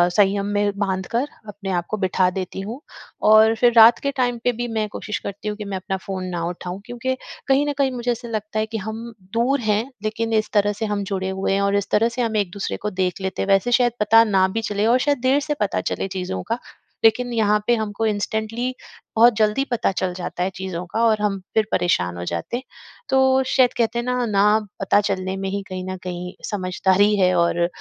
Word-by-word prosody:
संयम 200 -1 +3
में 205 0 +2
बाँधकर 205 +6 -1 0.2
अपने 205 -1 -7
आप 175 -2 -1
को 215 - -2
बिठा 185 -2 +2
देती 185 0 -5
हूँ। 220 +7 -6 0.5
और 220 +1 +7
फिर 240 +1 +3
रात 225 +1 +8
के 280 - -1
टाइम 245 -2 +1
पे 245 - +3
भी 240 - -1
मैं 215 -1 0
कोशिश 210 0 -5
करती 200 +2 -7
हूँ 210 0 -3
कि 210 - -6
मैं 200 -1 -3
अपना 190 +1 -3
फ़ोन 190 -1 -5
ना 175 -2 -3
उठाऊँ। 180 +2 -6
क्योंकि 245 +2 -3 0.3
कहीं 275 +1 +3
न 290 - 0
कहीं 275 -2 +2
मुझे 245 -1 -2
ऐसा 240 0 -5
लगता 215 -1 -3
है 215 - +1
कि 220 0 -5
हम 220 +2 -5 0.3
दूर 250 +5 +2
हैं 215 -1 +1 0.2
लेकिन 225 +1 -2
इस 215 -1 +1
तरह 205 -1 +3
से - - +1
हम 205 -1 -2
जुड़े 190 0 -2
हुए 190 0 -1
हैं 195 - +1
और 200 0 +1
इस 200 -1 -1
तरह 225 +2 +3
से 240 +2 -3
हम 225 -2 0
एक 200 -4 0
दूसरे 200 +1 -4
को 210 - -3
देख 180 +1 -1
लेते 190 0 -3
हैं। 195 - -2
वैसे 195 +5 +3
शायद 245 0 +4
पता 220 +2 +6
ना 195 -4 +3
भी 225 +4 -2
चले 205 0 0
और 245 +2 +4
शायद 285 -2 +2
देर 260 +3 +3
से - - +3
पता 205 - 0
चले - - -2
चीज़ों 185 +1 -3
का। 235 - 0 0.4
लेकिन 240 +2 +3
यहाँ 210 -2 +3
पे 240 - +4
हमको 220 0 -2
इंस्टेंटली 220 +4 -2 0.4
बहुत 235 +2 +6
जल्दी 215 +4 +2
पता 235 -4 +1
चल 185 -1 -2
जाता 180 0 -4
है 185 - 0
चीज़ों 185 -2 -5
का 225 - +1
और 215 -2 +2
हम 200 -2 0
फिर 220 -1 +3
परेशान 90 - +1
हो 85 - -5
जाते 85 - -3
हैं। 255 - -8 0.5
तो 265 0 +4
शायद 255 -2 +3
कहते 235 0 +1
हैं 240 - -3
ना, 250 0 0
ना 210 0 +3 0.2
पता 195 +1 +3
चलने 190 -1 -2
में 195 0 -3
ही 200 +1 -2
कहीं 185 -1 -5
न 185 - -5
कहीं 180 0 -5 0.2
समझदारी 195 +1 +2
है 185 -1 +4
और 170 0 +2
210 Hz, 230 wpm, -22 LUFS, 190-230 Hz, 0.5 s, रात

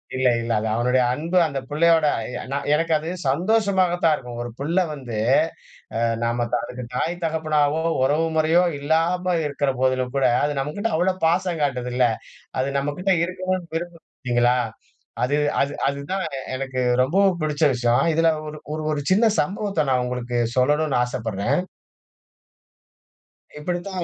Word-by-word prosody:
இல்ல, 130 0 +2
இல்ல. 115 0 -3
அது 110 - -2
அவனுடைய 125 +2 +2
அன்பு. 165 +7 -1
அந்த 140 -3 -3
பிள்ளையோட 160 +1 +3
அ - - -4
ய - - -4 0.3
எனக்கு 165 +2 +1
அது 155 +2 -5 0.2
சந்தோஷமாக 190 +3 +2
தான் 160 - +5
இருக்கும். 120 -4 -8
ஒரு 120 - -5
புள்ள 155 +6 -2 0.2
வந்து 125 -6 -6 0.8
அ - - 0 0.2
நாம 120 +1 0 0.2
அதுக்கு 125 0 -7
தாய் 165 +7 -1
தகப்பனாவோ, 155 -1 +1 0.2
உறவு 150 +5 +2
முறையோ 160 +3 +4 0.2
இல்லாம 170 +5 +1
இருக்குற 140 -1 0
போதிலும் 130 -1 +1
கூட, 135 - +2 0.2
அது 145 -1 -1
நம்மக்கிட்ட 180 +11 -2
அவ்ள 180 +3 +2 0.2
பாசம் 175 0 +1
காட்டுதுல்ல. 125 -2 0 0.6
அது 130 - 0
நம்மகிட்ட 165 +8 0
இருக்கனுன்னு 185 -1 -3
விரும்பும் 170 0 -6
பார்த்தீங்களா? 120 -1 +1 0.7
அது 140 +4 +1 0.2
அது 140 +1 +1 0.2
அதுதான் 140 +8 -3 0.3
எனக்கு 130 -1 -3 0.2
ரொம்பவும் 190 +7 +3
புடிச்ச 150 0 0
விஷயம். 120 +2 +2
இதில 165 +1 +3 0.2
ஒரு 150 0 -7 0.2
ஒரு 155 - -4
ஒரு 150 - -1
சின்ன 215 +5 +4
சம்பவத்த 195 -3 -1
நான் 130 -1 +2
உங்களுக்கு 125 -1 -3 0.2
சொல்லனுன்னு 145 +3 +2
ஆசைப்பட்றேன், 125 - -1 2.0
இப்பிடித்தான் 180 +3 -3
150 Hz, 140 wpm, -23 LUFS, 130-175 Hz, 2.0 s, தான்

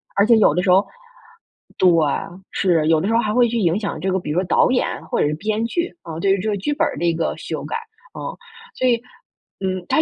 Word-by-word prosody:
而 200 - +4
且 230 -1 +6
有 215 - +5
的 180 - +1
时 185 - -1
候 190 +3 +5 0.9
对， 185 - +6 0.6
是， 165 -5 +1
有 160 -1 +4
的 190 - -1
时 225 - 0
候 - - +4
还 215 -2 0
会 245 0 +4
去 235 - -1
影 175 0 +1
响 205 - -4
这 190 0 -1
个 190 - +1
比 175 - -7
如 165 - +1
说 - - 0
导 180 - +3
演 250 - -1
或 - - -1
者 - - +3
是 150 - -1
编 215 +7 -2
剧， 340 +9 -2
呃， 165 -1 -7
对 195 +3 +2
于 195 - +3
这 215 - -3
个 - - 0
剧 245 +10 -2
本 290 - +1
儿 - - -5
的 175 - -1
一 170 - +3
个 165 -1 -1
修 - - -5
改， - - -4 0.4
嗯。 - - -6 0.4
所 255 - +1
以， 240 -2 +4 0.6
嗯， 185 -1 -2
它 310 - +4
195 Hz, 280 characters per minute, -21 LUFS, 175-225 Hz, 0.9 s, 且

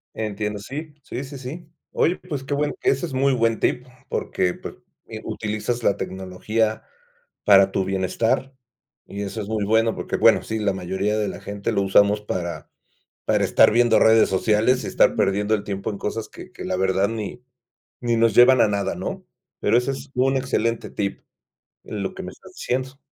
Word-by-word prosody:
Entiendo, 105 -1 -3
sí, 145 +8 -7
sí, 130 0 -6
sí, 140 +1 -8
sí. 155 +6 -8 0.2
Oye, 175 +3 +1
pues, 140 -3 -6
qué 145 - -3
bueno, 145 +1 0
ese 135 - +2
es - - -9
muy 135 +1 +2
buen 115 -2 +1
tip 125 +1 0 0.2
porque, 90 -1 -1
pues, - - -9 0.3
eh, - - -7
utilizas 110 +3 -3
la 100 - +2
tecnología 105 +4 -2 0.6
para 100 -1 +6
tu 95 - 0
bienestar, 95 +7 0 0.5
y 100 +1 -5
eso 105 +2 -4
es 100 - -6
muy 110 -2 -1
bueno. 110 +2 +2
Porque, - - -3
bueno, - - +5
sí, 110 0 -3
la 105 -2 +1
mayoría 95 +3 -1
de 105 - 0
la - - -8
gente 100 +2 -3
lo 100 -2 +1
usamos 100 +2 +4
para 85 -4 -4 0.6
para - - +2
estar - - +5
viendo 120 0 +4
redes 110 0 +5
sociales, 110 +6 +2
y - - -3
estar - - +3
perdiendo 105 +2 +1
el 105 - -2
tiempo 100 -1 -3
en 100 - -6
cosas 110 +1 -4
que - - -12
que - - -8
la 95 - -1
verdad 95 +1 +2
ni 115 +2 -5 0.6
ni 120 -1 0
nos 115 -2 +3
llevan 125 +1 +7
a 110 - +5
nada, 100 -1 -1
¿no? - - -5 0.4
Pero - - +3
ese 125 +2 -1
es 135 +1 -8
un 135 +2 +2
excelente 115 -3 -1
tip 100 -1 -3 0.6
en 105 - -5
lo 95 - -4
que - - -6
me - - -7
estás - - -16
diciendo. 130 +2 -3
110 Hz, 190 wpm, -23 LUFS, 100-125 Hz, 0.6 s, llevan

